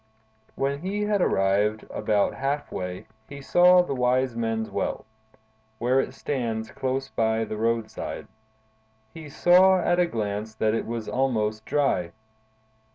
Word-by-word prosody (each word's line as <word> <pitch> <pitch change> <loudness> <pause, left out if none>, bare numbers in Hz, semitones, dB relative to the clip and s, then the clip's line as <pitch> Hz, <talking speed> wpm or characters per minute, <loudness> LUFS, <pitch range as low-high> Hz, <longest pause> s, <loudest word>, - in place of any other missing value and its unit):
When 140 +1 -1
he 195 +5 -2
had 210 -2 +1
arrived 105 - +1
about 105 -2 +1
half 140 +2 -3
way, 90 0 -5 0.2
he 140 0 -8
saw 180 +5 +5
the 160 - -3
Wise 125 -1 +1
Men's 115 -1 -2
Well, - - -3 0.7
where 125 +4 +2
it - - -2
stands 115 -5 -3
close 135 +1 -3
by 110 0 0
the 110 - -5
roadside. 115 0 -2 0.9
He 155 -2 -9
saw 185 +5 +5
at 175 0 +1
a 175 - +3
glance 105 -3 -4
that 110 0 +1
it 115 - -2
was 115 -1 -4
almost 110 -5 -1
dry. 95 -13 0
120 Hz, 140 wpm, -25 LUFS, 110-145 Hz, 0.9 s, saw